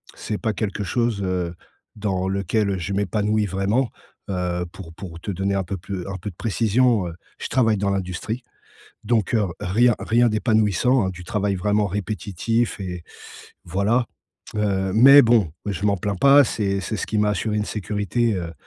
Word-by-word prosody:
C'est 105 - -4
pas 110 -2 -1
quelque 105 0 -3
chose, 115 -1 0
heu, 90 -2 -1 0.4
dans 95 -3 -1
lequel, 100 +2 0
heu, 95 - -1
je 100 +3 -3
m'épanouis 105 +2 0
vraiment. 100 +6 0 0.4
Heu, 90 -2 -1
pour 85 -4 -10
pour 85 -3 -8
te 100 - -7
donner 95 +1 -1
un 95 - 0
peu 95 +2 -4
pl 95 0 -6
un 100 -1 -4
peu 100 +3 -6
de - - -22
précision, 115 0 +2
heu, 85 - -6 0.3
je - - -4
travaille 110 -5 +2
dans 100 0 0
l'industrie. 95 +5 -3 0.6
Donc, 110 -2 +1
heu, 115 - +3
r 95 - -3
rien 115 +5 +3
rien 120 +1 +3
d'épanouissant, 110 +1 +2
hein. - - 0
Du 90 -1 -8
travail 100 +2 -1
vraiment 105 +2 +1
répétitif 105 +3 -2
et 90 -3 -5 0.6
voilà. 100 +7 +1 0.5
Heu, 95 -2 0
mais 135 +5 +9
bon, 115 -9 +3
je 100 -1 -3
m'en 100 - +2
plains 100 +2 -2
pas, 140 +7 +7
c'est 100 -4 -1
c'est 95 +4 -3
ce - - -3
qui 110 - -1
m'a 105 0 +3
assuré 105 +1 -1
une 105 - 0
sécurité, 105 +3 -1
heu, 85 -3 -4
100 Hz, 185 wpm, -23 LUFS, 95-110 Hz, 0.6 s, mais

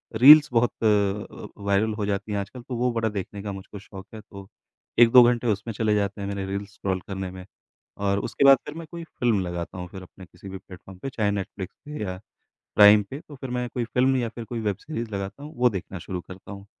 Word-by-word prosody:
Reels 150 +6 +9
बहुत 120 0 +3
अ, 105 -1 0 0.2
viral 100 +2 +1
हो 105 -1 -3
जाती 100 +1 -2
हैं 100 - 0
आजकल 110 +6 -7
तो 125 +1 -6
वो 125 +1 +1
बड़ा 115 -1 0
देखने 100 0 -5
का 105 - -4
मुझको 95 +1 -9
शौक 95 -1 -12
है 110 - -8
तो 100 -2 -12 0.5
1-2 120 +1 +9
घंटे 120 0 +2
उसमें 110 +1 -1
चले 105 0 +1
जाते 100 0 -1
हैं 100 - -3
मेरे 100 -1 -3
रील्स 100 +1 -5
स्क्रॉल 95 -1 -2
करने 95 -2 -4
में। 95 0 -10 0.5
और 100 0 0
उसके 140 - -1
बाद 135 0 +9
फिर 150 - -8
मैं 165 -1 -8
कोई 170 -1 -7
फ़िल्म 120 -9 0
लगाता 85 +1 -5
हूँ 90 0 -6
फिर 95 - -8
अपने 95 +1 -14
किसी 90 +2 -13
भी 95 - -6
प्लेटफ़ॉर्म 95 0 -13
पे 135 - -5
चाहे 105 -5 0
नेटफ्लिक्स 100 -1 -5
पे 150 -3 -7
या 90 -2 -5 0.6
प्राइम 105 0 +8
पे, 135 - -5
तो 150 - -14
फिर 130 -1 -7
मैं 125 0 -2
कोई 125 - -1
फ़िल्म 130 +3 +2
या 120 -2 0
फिर 115 +1 -8
कोई 115 0 -5
वेब 105 -3 -1
सीरीज 120 -7 -5
लगाता 100 +6 -5
हूँ, 150 +1 -9
वो 125 0 +4
देखना 95 -2 -6
शुरू 90 +1 -5
करता 95 +3 -11
हूँ 100 0 -10
105 Hz, 235 wpm, -25 LUFS, 95-120 Hz, 0.6 s, रील्स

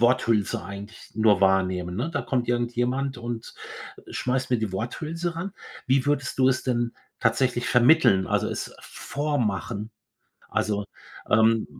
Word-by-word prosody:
Worthülse 115 -6 +2
eigentlich 100 +2 -9
nur 110 -3 +4
wahrnehme, 95 -2 +2
ne? 120 - -2
Da - - -1
kommt 125 -3 -1
irgendjemand 120 +3 0
und 120 -1 -6 0.6
schmeißt 125 0 -1
mir 125 - +3
die 110 -3 -2
Worthülse 160 - -3
ran. 185 +3 -4 0.3
Wie 130 0 +2
würdest 145 -3 0
du 130 0 +5
es 130 -1 +1
denn 120 -2 0 0.3
tatsächlich 120 +1 +1
vermitteln, 120 -6 +5
also, - - +1
es - - -5
vormachen? 115 -7 -2 0.6
Also, 105 -1 0 0.5
ähm, 110 +1 +4
120 Hz, 130 wpm, -25 LUFS, 105-130 Hz, 0.6 s, du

